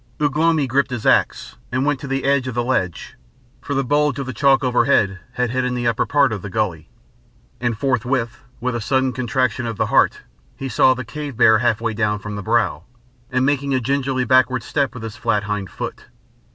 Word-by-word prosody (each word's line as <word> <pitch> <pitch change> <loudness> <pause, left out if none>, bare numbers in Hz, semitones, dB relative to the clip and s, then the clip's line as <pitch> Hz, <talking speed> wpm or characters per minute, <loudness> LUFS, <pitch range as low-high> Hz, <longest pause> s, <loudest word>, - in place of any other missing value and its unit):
Ugh 145 -2 0
lomi 160 -2 +2
gripped 135 +2 +1
his 125 -3 -5
axe, - - +1
and 130 +2 0
went 145 -2 0
to 140 - -7
the 135 0 -2
edge 140 -1 +1
of 130 - -4
the 120 - 0
ledge, 120 -9 -2 0.4
for 140 - -4
the 135 - +1
bulge 145 +1 +1
of 140 - -3
the 130 - -5
chalk 135 +3 +3
overhead 120 -6 +2
had 125 -2 -1
hidden 125 0 -1
the 120 -1 -2
upper 115 -2 +1
part 140 -5 +3
of 100 - -5
the 105 - -7
gully. 90 -6 -2 0.7
And 120 -3 -1
forthwith, 125 -1 -1 0.2
with 125 +1 -2
a 120 - -3
sudden 130 +2 +1
contraction 125 0 -1
of 115 -2 -4
the - - +1
heart, - - +3 0.4
he 135 - -5
saw 130 +3 +4
the 130 0 -6
cave 145 0 -7
bear 110 -2 +6
half 120 -2 +1
way 115 -1 -1
down 105 -1 0
from 105 0 -7
the 105 - -4
brow, 110 -7 0 0.5
and 130 0 +1
making 140 -1 +1
a - - +2
gingerly 130 0 -1
backward 130 -1 +3
step 140 0 -1
with 120 - -8
his 110 -1 -7
flat 105 -1 0
hind 105 -2 -3
foot. - - -7
125 Hz, 215 wpm, -20 LUFS, 115-135 Hz, 0.7 s, bear